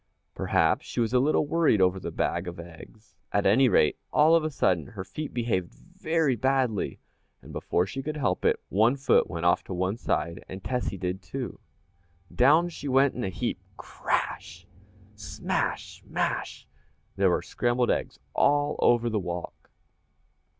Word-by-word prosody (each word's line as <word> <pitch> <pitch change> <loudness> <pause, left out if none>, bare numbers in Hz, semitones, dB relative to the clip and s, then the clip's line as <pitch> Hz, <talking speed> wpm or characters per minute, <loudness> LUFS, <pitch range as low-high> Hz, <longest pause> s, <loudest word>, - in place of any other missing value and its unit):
Perhaps - - +1
she - - -4
was 115 0 0
a 125 - +5
little 150 +3 +2
worried 160 -7 +2
over 95 0 +3
the - - -5
bag 85 +1 -2
of 85 -1 -7
eggs. 85 +6 -13 0.2
At 100 - +1
any 125 +6 +5
rate, 75 -7 +3
all 155 +2 +5
of 165 -1 +4
a 155 - -1
sudden 90 - +1
her 105 -5 -7
feet 150 +10 -6
behaved 115 -8 -2
very 165 -5 -1
badly, 130 -3 0 0.5
and - - -12
before 90 - 0
she 135 +8 -5
could 155 +2 -4
help 105 -10 -1
it, - - +2
one 110 +6 +3
foot 135 0 +2
went 85 -1 -4
off 85 - +3
to 95 - -5
one 95 +4 -1
side 85 -7 -2
and 95 0 -8
Tessie 125 -6 -2
did, 90 0 -3
too. - - -6 0.7
Down 150 +7 +5
she 160 -4 -7
went 135 +1 +3
in 125 - -4
a 95 - -1
heap. 90 -2 -3 0.2
Crash! - - -3 0.5
smash! - - -3
mash! - - -2 0.5
there - - +3
were - - 0
scrambled 120 0 0
eggs - - -2 0.2
all 145 +1 +2
over 120 0 +3
the 110 -2 0
walk! 90 -2 -6
120 Hz, 165 wpm, -27 LUFS, 95-140 Hz, 0.7 s, a